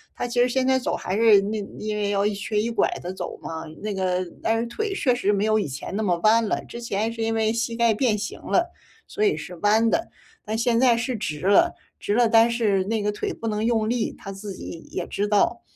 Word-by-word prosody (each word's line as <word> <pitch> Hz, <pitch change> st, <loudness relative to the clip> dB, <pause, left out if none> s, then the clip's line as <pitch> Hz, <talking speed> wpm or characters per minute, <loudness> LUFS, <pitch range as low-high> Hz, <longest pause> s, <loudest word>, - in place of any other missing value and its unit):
他 -, -, -3 dB
其 245 Hz, 0 st, +1 dB
实 250 Hz, -, +3 dB
现 260 Hz, +1 st, +1 dB
在 260 Hz, 0 st, +3 dB
走 -, -, -2 dB
还 185 Hz, -, -3 dB
是 220 Hz, -2 st, +6 dB
那 210 Hz, +2 st, -2 dB, 0.2 s
因 215 Hz, 0 st, -3 dB
为 205 Hz, -1 st, -1 dB
要 200 Hz, 0 st, +1 dB
一 210 Hz, -, +1 dB
瘸 205 Hz, +1 st, -2 dB
一 230 Hz, +2 st, -1 dB
拐 230 Hz, -, +2 dB
地 180 Hz, -, -4 dB
走 -, -, -6 dB
嘛， 160 Hz, 0 st, -6 dB, 0.2 s
那 210 Hz, -1 st, -2 dB
个 185 Hz, -1 st, 0 dB, 0.2 s
但 225 Hz, 0 st, +1 dB
是 235 Hz, -, -1 dB
腿 405 Hz, -, -3 dB
确 260 Hz, -9 st, +2 dB
实 210 Hz, -4 st, +1 dB
没 205 Hz, 0 st, +1 dB
有 215 Hz, 0 st, +3 dB
以 180 Hz, -, -1 dB
前 135 Hz, +7 st, -6 dB
那 215 Hz, -, -1 dB
么 180 Hz, -5 st, +1 dB
弯 225 Hz, +2 st, +5 dB
了。 -, -, -1 dB
之 235 Hz, -, -8 dB
前 225 Hz, 0 st, -2 dB
是 230 Hz, -, -6 dB
因 225 Hz, 0 st, 0 dB
为 220 Hz, 0 st, +1 dB
膝 230 Hz, 0 st, -2 dB
盖 235 Hz, -1 st, +3 dB
变 215 Hz, -2 st, +1 dB
形 210 Hz, -, -5 dB
了， 345 Hz, 0 st, 0 dB, 0.4 s
所 420 Hz, -, -2 dB
以 410 Hz, -, +3 dB
是 180 Hz, -, -7 dB
弯 220 Hz, +5 st, +3 dB
的。 335 Hz, -, 0 dB, 0.4 s
但 220 Hz, +1 st, -2 dB
现 230 Hz, 0 st, +2 dB
在 245 Hz, -3 st, +4 dB
是 240 Hz, +2 st, -2 dB
直 155 Hz, -8 st, -4 dB
了， 195 Hz, +2 st, +4 dB, 0.3 s
直 205 Hz, -, -1 dB
了， 240 Hz, 0 st, +4 dB
但 225 Hz, +1 st, +6 dB
是 210 Hz, -5 st, +1 dB
那 220 Hz, +1 st, -1 dB
个 210 Hz, 0 st, 0 dB
腿 205 Hz, -, -3 dB
不 230 Hz, -, -6 dB
能 210 Hz, 0 st, -1 dB
用 225 Hz, -2 st, +1 dB
力， 240 Hz, -2 st, 0 dB
他 195 Hz, -, -8 dB
自 195 Hz, 0 st, -7 dB
己 165 Hz, -2 st, -9 dB
也 180 Hz, -, -4 dB
知 205 Hz, -, -2 dB
道。 210 Hz, -1 st, +2 dB
220 Hz, 275 characters per minute, -24 LUFS, 205-235 Hz, 0.4 s, 是